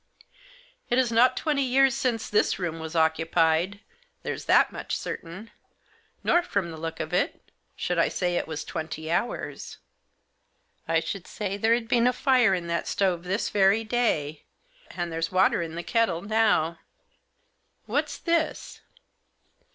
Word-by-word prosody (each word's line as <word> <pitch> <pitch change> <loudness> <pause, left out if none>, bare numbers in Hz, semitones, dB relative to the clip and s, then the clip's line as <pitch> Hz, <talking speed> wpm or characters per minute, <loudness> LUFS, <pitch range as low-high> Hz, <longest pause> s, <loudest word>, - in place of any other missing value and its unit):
" - - -27
It 245 - +2
is 255 -2 +2
not 235 +3 +4
twenty 295 -3 0
years 265 +1 +3
since 250 -4 -1
this 210 - +2
room 170 -3 -3
was 160 +1 -7
occupied, 165 +4 +2 0.4
there's - - -4
that - - +4
much - - -4
certain; 185 +7 -7 0.7
nor, 345 - +4
from 200 - -2
the 160 - -8
look 165 +1 -5
of - - -4
it, - - -1 0.2
should - - -1
I - - +4
say 180 -1 -1
it - - -1
was 160 -2 -4
twenty 160 -1 -5
hours. 175 +8 -3 1.1
I 165 0 +2
should 175 +3 -5
say 200 -2 -4
there 225 +3 +3
had 235 -1 -4
been 240 0 +3
a 250 - +3
fire 250 -8 +3
in 175 -2 -4
that 170 0 -2
stove 180 -3 0
this 190 +3 -1
very 200 +2 +3
day, 210 -11 0 0.5
and 175 -1 -4
there's 165 0 -2
water 185 -1 +3
in 165 -1 -5
the 170 - -4
kettle 190 -7 0
now." 205 -6 +2 1.1
"What's - - -1
this?" 335 -2 -1
195 Hz, 155 wpm, -26 LUFS, 165-240 Hz, 1.1 s, not